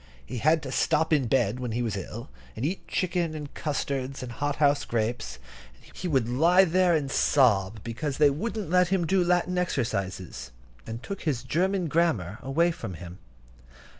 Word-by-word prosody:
He 125 Hz, -, -5 dB
had 155 Hz, +5 st, +3 dB
to 130 Hz, -, -5 dB
stop 160 Hz, +3 st, +2 dB
in 140 Hz, -5 st, +2 dB
bed 120 Hz, -2 st, +1 dB
when 125 Hz, -3 st, -3 dB
he 120 Hz, +1 st, -1 dB
was 110 Hz, -4 st, -2 dB
ill, 110 Hz, +6 st, -6 dB, 0.3 s
and 115 Hz, -, -3 dB
eat 180 Hz, +6 st, -3 dB
chicken 170 Hz, -3 st, -1 dB
and 150 Hz, -2 st, -7 dB
custards 135 Hz, -3 st, -3 dB
and 125 Hz, -, -6 dB
hot 145 Hz, +4 st, -2 dB
house 145 Hz, -1 st, +3 dB
grapes; 115 Hz, -, -2 dB, 0.4 s
and -, -, -20 dB
he 185 Hz, -, -4 dB
would 135 Hz, -8 st, +1 dB
lie 170 Hz, +10 st, +5 dB
there 180 Hz, 0 st, +3 dB
and 140 Hz, -3 st, -1 dB
sob, 110 Hz, -9 st, +3 dB
because 135 Hz, +5 st, -3 dB
they 150 Hz, -2 st, +5 dB
wouldn't 210 Hz, +3 st, -3 dB
let 180 Hz, 0 st, +4 dB
him 180 Hz, -1 st, +1 dB
do 185 Hz, +2 st, +2 dB
Latin 180 Hz, +1 st, +1 dB
exercises, 100 Hz, -, -3 dB, 0.4 s
and 115 Hz, +2 st, -6 dB
took 200 Hz, -, -6 dB
his 130 Hz, -6 st, -1 dB
German 180 Hz, +6 st, 0 dB
grammar 135 Hz, -, 0 dB
away 165 Hz, +7 st, +2 dB
from 115 Hz, -, -6 dB
him. 90 Hz, +3 st, -10 dB
145 Hz, 180 wpm, -27 LUFS, 120-170 Hz, 0.4 s, lie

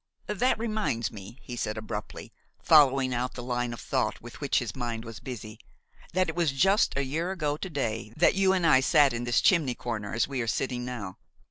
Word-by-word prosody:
"That 225 Hz, +5 st, +1 dB
reminds 215 Hz, -, -1 dB
me," 105 Hz, +3 st, -10 dB
he 125 Hz, -, -7 dB
said 110 Hz, -2 st, -3 dB
abruptly, 110 Hz, 0 st, -6 dB, 0.3 s
following 135 Hz, -4 st, +5 dB
out 125 Hz, +1 st, -2 dB
the 120 Hz, -, -6 dB
line 120 Hz, -1 st, -2 dB
of 120 Hz, -, -7 dB
thought -, -, -1 dB
with -, -, -12 dB
which -, -, +1 dB
his -, -, -2 dB
mind 120 Hz, -2 st, -4 dB
was 115 Hz, 0 st, -8 dB
busy, 110 Hz, -4 st, -8 dB, 0.5 s
"that 185 Hz, +1 st, +2 dB
it 160 Hz, -, -4 dB
was 170 Hz, -4 st, +2 dB
just 190 Hz, +4 st, +3 dB
a 140 Hz, -, +1 dB
year 160 Hz, +7 st, -2 dB
ago 155 Hz, -6 st, -1 dB
to 190 Hz, -, -5 dB
day 115 Hz, -8 st, -3 dB
that 170 Hz, -, +5 dB
you 190 Hz, 0 st, +3 dB
and 185 Hz, -3 st, +1 dB
I 130 Hz, -5 st, +6 dB
sat 140 Hz, 0 st, +4 dB
in 120 Hz, +1 st, -3 dB
this 120 Hz, -1 st, +2 dB
chimney 155 Hz, -10 st, +3 dB
corner 110 Hz, -4 st, -4 dB
as 115 Hz, -, +1 dB
we 135 Hz, -3 st, -3 dB
are 115 Hz, -, -3 dB
sitting 125 Hz, +2 st, -1 dB
now. 115 Hz, -7 st, -6 dB
130 Hz, 215 wpm, -28 LUFS, 115-165 Hz, 0.5 s, I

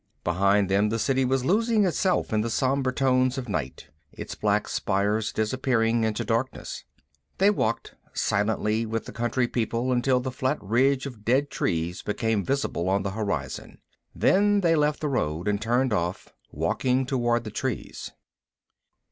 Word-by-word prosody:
Behind 100 Hz, +3 st, +2 dB
them 100 Hz, +2 st, +2 dB
the 115 Hz, -, -1 dB
City 135 Hz, +3 st, +1 dB
was 130 Hz, 0 st, 0 dB
losing 220 Hz, -, +3 dB
itself 185 Hz, -, 0 dB
in 105 Hz, -, +2 dB
the 115 Hz, -, -2 dB
sombre 130 Hz, +2 st, +1 dB
tones 130 Hz, -1 st, +2 dB
of 130 Hz, -2 st, -4 dB
night, 75 Hz, -, -4 dB, 0.2 s
its -, -, -7 dB
black -, -, 0 dB
spires 105 Hz, +2 st, 0 dB
disappearing 115 Hz, 0 st, +1 dB
into 110 Hz, -1 st, -1 dB
darkness. 120 Hz, +3 st, -2 dB, 0.5 s
They 200 Hz, +2 st, +5 dB
walked 115 Hz, -, -2 dB, 0.2 s
silently 105 Hz, +2 st, 0 dB
with 115 Hz, 0 st, -3 dB
the -, -, -8 dB
country 120 Hz, +1 st, 0 dB
people 120 Hz, +1 st, -1 dB
until 125 Hz, +1 st, +2 dB
the 130 Hz, +1 st, -4 dB
flat 130 Hz, +1 st, -1 dB
ridge 130 Hz, +6 st, +2 dB
of 120 Hz, -6 st, -8 dB
dead 135 Hz, +6 st, +1 dB
trees 85 Hz, +1 st, -1 dB
became 110 Hz, 0 st, -1 dB
visible 115 Hz, -8 st, -1 dB
on 95 Hz, +1 st, +1 dB
the 100 Hz, -, -2 dB
horizon. 95 Hz, -11 st, -4 dB, 0.4 s
Then 205 Hz, +1 st, +3 dB
they 165 Hz, -2 st, +3 dB
left 150 Hz, -1 st, +1 dB
the 155 Hz, -, 0 dB
road 85 Hz, -, -1 dB
and 105 Hz, 0 st, 0 dB
turned 120 Hz, +2 st, +1 dB
off, 90 Hz, -2 st, -2 dB, 0.2 s
walking 130 Hz, +1 st, 0 dB
toward 120 Hz, -3 st, 0 dB
the 105 Hz, -, -7 dB
trees. 130 Hz, +3 st, -4 dB
120 Hz, 155 wpm, -26 LUFS, 105-130 Hz, 0.5 s, They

